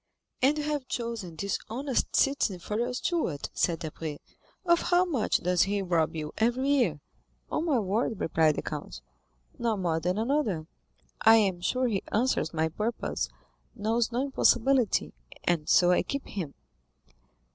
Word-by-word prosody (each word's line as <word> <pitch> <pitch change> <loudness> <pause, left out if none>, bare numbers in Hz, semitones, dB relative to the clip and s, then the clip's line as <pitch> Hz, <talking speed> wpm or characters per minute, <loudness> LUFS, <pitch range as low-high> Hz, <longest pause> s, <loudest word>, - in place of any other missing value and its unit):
"And 280 +4 +4
you 300 - -1
have 295 -3 -2
chosen 230 -10 -4
this 200 +5 -2
honest 265 +3 -1
citizen 270 -9 +2
for 210 +5 -4
your 240 +1 0
steward," 250 - -2
said 170 -2 +1
Debray. 155 -1 -5 0.5
"Of 340 -1 +4
how 355 +1 +4
much 275 -12 +1
does 180 0 +2
he 200 0 +1
rob 170 -3 +1
you 150 -1 -5
every 245 +4 +1
year?" 240 - +2 0.5
"On 325 - 0
my 300 -6 +2
word," 215 +1 -1
replied 160 -2 +2
the - - -3
count, - - -6 0.6
"not 230 -2 0
more 170 -4 0
than 180 +4 -1
another. 225 - 0 0.6
I 225 0 +8
am 195 -5 +2
sure 255 +8 +1
he 205 -5 0
answers 225 -8 +1
my 160 -1 0
purpose, 210 - -2 0.5
knows 225 +2 0
no 245 +3 0
impossibility, 265 -3 +2 0.3
and 165 -3 0
so 180 0 +5
I 180 - +4
keep 280 0 -4
him." 170 -8 -5
220 Hz, 155 wpm, -28 LUFS, 175-260 Hz, 0.6 s, I